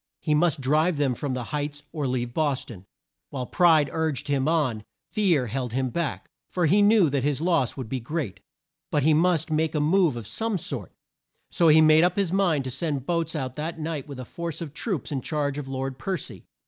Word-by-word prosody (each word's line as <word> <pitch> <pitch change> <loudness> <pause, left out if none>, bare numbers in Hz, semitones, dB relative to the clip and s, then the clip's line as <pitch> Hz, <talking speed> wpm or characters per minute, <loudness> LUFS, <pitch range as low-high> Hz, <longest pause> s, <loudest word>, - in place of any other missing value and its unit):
He 155 - 0
must 160 -1 +2
drive 155 +5 +2
them 140 -3 +1
from 130 +2 -3
the 125 - -3
Heights, 145 0 -3
or 150 -4 -2
leave 120 -1 -2
Bos 145 -3 0
ton. 100 -5 -11 0.4
While 130 -3 -4
pride 160 -1 +4
urged 155 -3 -1
him 140 -1 +1
on, 140 -10 +1 0.3
fear 180 - +2
held 125 0 -3
him 130 -1 -1
back, 170 -3 -3 0.2
for 180 -2 0
he 195 +7 +4
knew 205 -3 +5
that 140 -1 +1
his 140 +1 0
loss 165 -7 +1
would 130 -4 -5
be 130 +3 -3
great. 130 - -4 0.5
But 145 - +1
he 155 +2 +4
must 165 0 +2
make 155 +1 0
a - - +2
move 160 -2 +3
of 115 - -6
some 220 - -1
sort, 130 - -5 0.6
so 170 - +3
he 160 0 +7
made 155 +1 +6
up 180 0 +2
his 195 -3 0
mind 175 -8 +2
to 130 - -4
send 145 -2 -2
boats 170 -1 -1
out 130 -4 -3
that 160 +2 -4
night 155 -3 -4
with 140 -3 -8
a 130 - -6
force 170 +4 -5
of 155 -4 -6
troops 175 - -3
in 135 -3 -2
charge 145 0 -2
of 140 - -6
Lord 135 0 -4
Per 190 +4 -2
cy. - - -9
150 Hz, 220 wpm, -25 LUFS, 130-165 Hz, 0.6 s, he